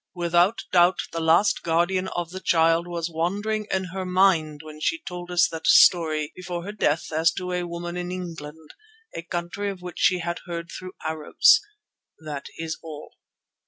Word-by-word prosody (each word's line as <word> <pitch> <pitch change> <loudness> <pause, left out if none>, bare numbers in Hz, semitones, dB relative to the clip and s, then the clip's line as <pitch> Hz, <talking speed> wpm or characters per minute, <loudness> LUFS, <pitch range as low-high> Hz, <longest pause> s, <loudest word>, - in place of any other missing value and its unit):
Without 175 +4 +2
doubt 175 0 +5
the 165 - -3
last 170 +5 +3
Guardian 175 +3 +1
of 175 -2 -4
the 185 - -6
Child 165 -1 +2
was 170 -1 -3
wandering 205 +6 -2
in 190 -1 -1
her 190 0 -3
mind 180 -5 +2
when 155 -1 -11
she 325 - 0
told 180 - -8
us 180 0 +3
that 160 -1 -5
story 155 -4 +5
before 180 -1 -5
her 200 - -6
death 165 -7 -1
as 160 +1 +3
to 180 0 -5
a 180 -1 -2
woman 175 0 -6
in 180 0 -4
England, 160 -4 -8 0.4
a - - -4
country 175 +4 -4
of 190 -2 -8
which 180 -1 -8
she 185 - +4
had 170 0 -4
heard 170 0 -5
through 185 0 -8
Arabs. 160 - +4 0.6
That 150 -3 -7
is 160 0 -5
all." 155 -2 -9
175 Hz, 175 wpm, -24 LUFS, 160-185 Hz, 0.6 s, doubt